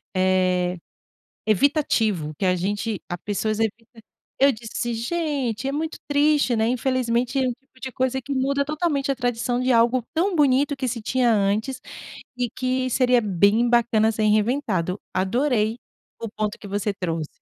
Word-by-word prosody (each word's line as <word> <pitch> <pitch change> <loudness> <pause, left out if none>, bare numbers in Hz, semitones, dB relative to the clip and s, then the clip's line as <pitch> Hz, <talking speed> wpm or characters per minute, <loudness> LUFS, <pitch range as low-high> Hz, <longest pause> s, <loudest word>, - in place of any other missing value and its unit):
eh, 185 -1 +2 0.7
evitativo 215 - +1
que - - -2
a 180 - +3
gente 205 +3 -2
a 175 - -3
pessoas 210 +3 -2
evita. 225 +1 -3 0.4
Eu 275 +1 +6
disse: 235 +1 -4
"Gente 265 -2 -2
é - - -2
muito 315 +2 -3
triste, 290 -3 +3
né, 220 0 +2
infelizmente 250 0 0
é - - +2
um 255 -1 +1
tipo 265 -1 -27
de 260 0 -6
coisa, 260 +1 -1
que 275 +3 -4
muda 275 +2 +1
totalmente, 295 -2 -1
a - - +2
tradição 245 0 -1
de 255 0 +2
algo 235 +2 +3
tão 355 +4 +1
bonito, 285 0 +3
que 260 -2 -2
se 230 -1 -3
tinha 245 +1 +2
antes, 215 +6 0 0.6
e 245 -1 -1
que 255 0 -1
seria 250 -1 +3
bem 205 +4 +3
bacana, 225 -2 +3
ser 215 - -2
reinventado." 210 - +1
Adorei 220 +3 +1 0.4
o 230 - -4
ponto 210 -1 -3
que 205 - -11
você 205 +1 -2
trouxe. 165 -5 -3
235 Hz, 160 wpm, -23 LUFS, 210-265 Hz, 0.7 s, Eu